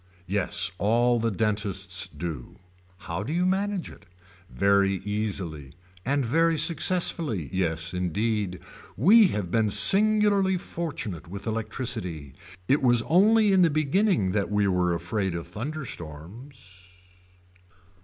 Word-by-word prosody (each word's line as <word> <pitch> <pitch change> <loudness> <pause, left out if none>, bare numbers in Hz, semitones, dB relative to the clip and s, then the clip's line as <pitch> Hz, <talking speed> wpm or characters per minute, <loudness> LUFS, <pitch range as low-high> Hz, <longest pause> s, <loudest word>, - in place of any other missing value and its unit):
Yes 100 +1 -1
all 120 +3 +2
the 115 0 0
dentists 100 -3 -2
do. 75 -4 -7 0.5
How 85 +3 -4
do 120 - -5
you 175 +2 0
manage 195 0 -1
it. 100 - -17 0.4
Very 100 -1 +2
easily. 95 -8 -4 0.3
And 140 +2 0
very 165 +6 +2
successful. 170 - +1
Yes 85 -1 -2
indeed. 90 +1 -2 0.4
We 205 - +6
have 100 - -4
been 110 -2 +1
singularly 200 - +4
fortunate 115 - -6
with 100 +3 -9
electricity. 110 - -4 0.3
It 140 - +2
was 120 -3 +3
only 210 +5 +4
in 190 -1 +4
the 170 - +5
beginning 155 - +1
that 100 0 -1
we 105 -1 +1
were 90 -2 +1
afraid 90 +2 -2
of 85 - -5
thunderstorms. 105 - -9
105 Hz, 120 wpm, -25 LUFS, -, 0.5 s, We